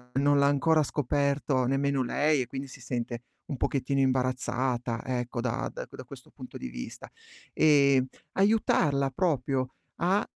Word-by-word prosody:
non 145 +1 +3
l'ha 140 - +4
ancora 155 +2 +3
scoperto 140 -1 0
nemmeno 135 +1 +1
lei 145 +3 +2
e 125 - -3
quindi 135 +2 -6
si 130 - -12
sente 120 -1 -4 0.2
un 145 -6 -5
pochettino 135 +1 0
imbarazzata, 125 -2 0
ecco, 125 -1 -2
da 125 0 -2
da - - -6
da - - -9
questo - - -13
punto - - -10
di - - -6
vista. - - -8 0.4
E 140 -4 +5 0.3
aiutarla 160 -9 +2
proprio 135 -5 0 0.2
a, 185 +4 +2
135 Hz, 145 wpm, -28 LUFS, 125-145 Hz, 0.4 s, E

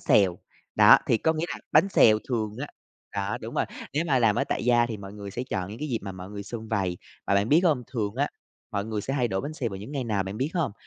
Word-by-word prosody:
xèo, 95 -4 +3 0.4
đó, - - +8
thì 115 - +3
có 160 - +2
nghĩa 160 +1 -2
là - - -4
bánh 195 - +6
xèo 110 - +6
thường 110 -4 -1
á 145 - -3 0.5
đó, 100 0 -2
đúng - - -7
rồi, - - +2 0.3
nếu 150 +4 0
mà 135 -4 +3
làm 115 -4 +3
ở - - +2
tại - - -2
gia 120 -1 +4
thì 115 -2 -4
mọi 100 0 -9
người 100 -1 -8
sẽ 120 - -4
chọn 90 -1 -2
những 110 - -8
cái 150 - -4
dịp 115 -3 0
mà 100 -1 -5
mọi 95 +1 -9
người 100 -1 -6
sum 110 +1 -7
vầy, 95 -5 -1 0.3
và 100 - +2
bạn 100 +3 +2
biết 155 +4 +6
hông, 150 -8 +3
thường 110 -6 -3
á, 145 +2 +1 0.4
mọi 100 0 -2
người 110 -1 -3
sẽ 135 +6 -3
hay 125 -4 +1
đổ 95 -1 -1
bánh 145 +2 -5
xèo 130 -6 -2
vào 95 - -5
những 105 +9 -8
ngày 135 -3 -2
nào 105 -4 0
bạn 95 +2 -6
biết 135 +6 -1
hông? 165 - 0
110 Hz, 285 wpm, -26 LUFS, 100-135 Hz, 0.5 s, đó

